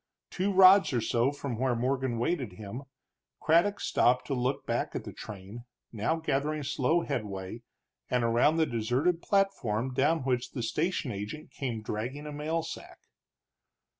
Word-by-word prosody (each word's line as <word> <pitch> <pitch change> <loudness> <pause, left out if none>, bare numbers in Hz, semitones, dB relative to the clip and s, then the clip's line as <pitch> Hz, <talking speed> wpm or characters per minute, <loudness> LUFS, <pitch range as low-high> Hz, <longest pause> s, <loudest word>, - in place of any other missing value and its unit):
Two 195 +2 0
rods 190 -3 +7
or 120 - +2
so 120 +4 +1
from 140 -5 -5
where 130 -1 +1
Morgan 130 0 -1
waited 120 - -1
him, 105 +6 -7 0.6
Craddock 170 +6 +3
stopped 125 +1 +2
to 140 - -2
look 130 +1 -1
back - - -2
at - - -3
the - - -8
train, 105 +4 -9 0.3
now 110 +8 0
gathering 155 -1 -1
slow 140 +4 +1
headway, 100 - -4 0.5
and 125 -1 +1
around 120 +7 +3
the 165 -1 +3
deserted 130 +9 0
platform, 130 - 0
down 145 +5 +2
which 125 -2 -1
the 120 - -3
station 150 +4 -1
agent 105 +10 -6
came 120 -5 -4
dragging 125 +8 -4
a 150 - -5
mail 155 +3 -2
sack. 165 - -8
130 Hz, 155 wpm, -29 LUFS, 115-155 Hz, 0.6 s, rods